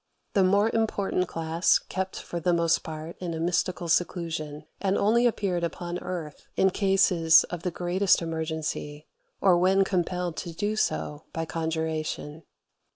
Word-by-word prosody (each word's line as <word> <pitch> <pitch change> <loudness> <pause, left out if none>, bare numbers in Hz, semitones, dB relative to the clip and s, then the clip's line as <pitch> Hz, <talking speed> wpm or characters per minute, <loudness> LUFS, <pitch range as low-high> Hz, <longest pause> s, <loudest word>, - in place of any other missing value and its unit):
The 195 - +4
more 200 +4 +3
important 200 -5 0
class 165 +1 +2
kept 190 0 -4
for 175 - -5
the 175 +1 +1
most 170 -1 +2
part 160 +1 -7
in 175 -2 -4
a - - -4
mystical 175 +1 0
seclusion, 160 -3 -1 0.2
and 195 0 +1
only 235 +4 +4
appeared 195 -6 -1
upon 175 +1 -3
earth 165 -5 -6
in 190 - +3
cases 180 -5 +4
of 175 - -4
the 180 - -1
greatest 180 +3 +2
emergency, 160 -2 -4 0.4
or 180 -3 +5
when 190 +2 +4
compelled 180 -2 -1
to 170 - -5
do 205 +5 -1
so 150 -7 -2
by 165 0 -2
conjuration. 160 -1 -3
175 Hz, 150 wpm, -27 LUFS, 160-190 Hz, 0.4 s, or